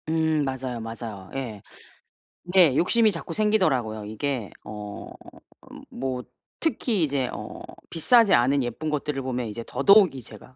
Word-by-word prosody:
음. 160 -1 +1
맞아요, 130 -3 -3
맞아요. 115 -4 -7
예. 115 -7 -5 0.8
네. 175 -6 +4
욕심이 220 +7 +4
자꾸 165 -2 -4
생기더라고요. 150 - +1
이게 115 +1 -3
어 105 -1 -8 0.6
음 - - -11
뭐 130 -1 -4 0.4
특히 235 - 0
이제 140 -4 0
어 - - -7 0.3
비싸지 225 +6 +4
않은 130 +3 +3
예쁜 120 +6 -4
것들을 150 -2 -2
보면 125 -2 -3
이제 115 +2 -6
더더욱이 175 0 +4
제가 110 +3 -13
135 Hz, 285 characters per minute, -25 LUFS, 115-165 Hz, 0.8 s, 네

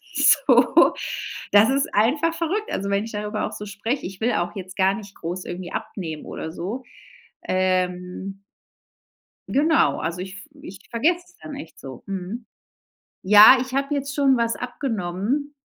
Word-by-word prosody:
So - - +5 0.6
Das 205 +2 +6
ist 275 0 0
einfach 295 +10 +2
verrückt, 360 +6 -2
also, 200 +1 -2
wenn 200 +1 +1
ich 225 - -8
darüber 210 +1 -3
auch - - -8
so 210 - -7
spreche. 210 +7 -3
Ich 190 +2 -8
will 240 +2 +1
auch 175 +4 -2
jetzt 190 0 -8
gar 190 0 +3
nicht 205 -2 -9
groß 175 +2 -5
irgendwie 175 0 -6
abnehmen 160 -6 -5
oder 160 - -6
so. 200 +10 -5 0.6
Ähm 185 +1 -1 1.1
genau, 315 +4 +3
also 170 +2 -3
ich 190 +2 -8
v 300 - -19
ich 195 -10 -10
vergesse 330 +10 +1
das 355 - -23
dann 290 - -8
echt 290 - -10
so 130 -3 -10
mhm, 195 +5 -5 0.8
ja, 210 +6 +9
ich 260 0 -5
habe 275 +2 0
jetzt 280 0 -3
schon 275 -2 +3
was 230 -1 0
abgenommen 240 +3 -3
210 Hz, 160 wpm, -23 LUFS, 185-275 Hz, 1.1 s, ja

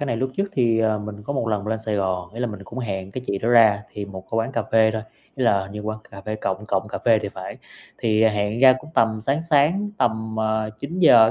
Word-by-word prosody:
cái 145 - -2
này 120 -4 -1
lúc 130 +3 -1
trước 195 +1 0
thì, 120 - +2
à, 110 -1 +2
mình 105 0 -7
có 125 - -4
một 125 -5 -1
lần 105 -2 -1
lên 110 +1 -1
Sài 110 -1 -3
Gòn, 95 -1 -2
ý 115 - -6
là 125 - +1
mình 105 -4 -7
cũng 115 +6 -8
hẹn 95 -6 -4
cái 125 +5 -6
chị 100 - -1
đó 110 - -2
ra 110 -4 +5
thì 105 - -5
một 95 -1 -8
cái 115 - -2
quán 115 +3 0
cà 115 - 0
phê 110 -1 +5
thôi, 110 0 -3 0.3
ý 130 - -1
là, 100 -4 +4
hình 95 +1 -9
như 105 - -5
quán 110 +1 -4
cà 100 - -10
phê 110 +2 -4
Cộng 95 -1 -3
Cộng 100 +2 0
Cà - - -4
Phê 115 -2 +5
thì 100 - -3
phải. 95 -2 -7 0.4
Thì 110 -1 +2
hẹn 105 0 +1
ra 130 -1 +9
cũng 155 +3 -13
tầm 110 -1 +2
sáng 135 +8 0
sáng 165 +6 +2
tầm, 110 -1 0
ờ, 110 0 0
9:00, 140 -6 +5
110 Hz, 275 wpm, -23 LUFS, 105-120 Hz, 0.4 s, ra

